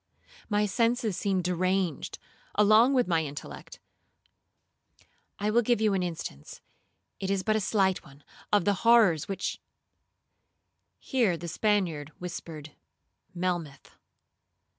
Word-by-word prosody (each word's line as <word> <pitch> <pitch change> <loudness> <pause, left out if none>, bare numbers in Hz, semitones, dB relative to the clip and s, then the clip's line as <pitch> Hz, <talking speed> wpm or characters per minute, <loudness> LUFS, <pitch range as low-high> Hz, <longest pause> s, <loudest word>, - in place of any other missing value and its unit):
My 210 0 +2
senses 230 0 +1
seemed 190 -1 0
deranged 180 -2 -1 0.4
along 215 +6 +5
with 250 -6 +2
my 165 -3 +2
intellect. 145 0 -8 1.6
I 210 +1 -1
will 235 +2 +4
give 240 -1 +1
you 215 -2 +2
an 190 - +1
instance, 165 - -6 0.6
it 190 - -3
is 195 -1 0
but 215 +1 +1
a - - +2
slight 190 -2 +1
one, 140 0 -17 0.3
of 205 -4 +3
the 205 - +3
horrors 220 -10 +5
which—' 195 - -4 1.4
Here 230 - 0
the 170 +2 -7
Spaniard 170 -6 0
whispered 160 -4 -7 0.6
Melmoth. 175 -5 -3
190 Hz, 120 wpm, -28 LUFS, 170-215 Hz, 1.6 s, along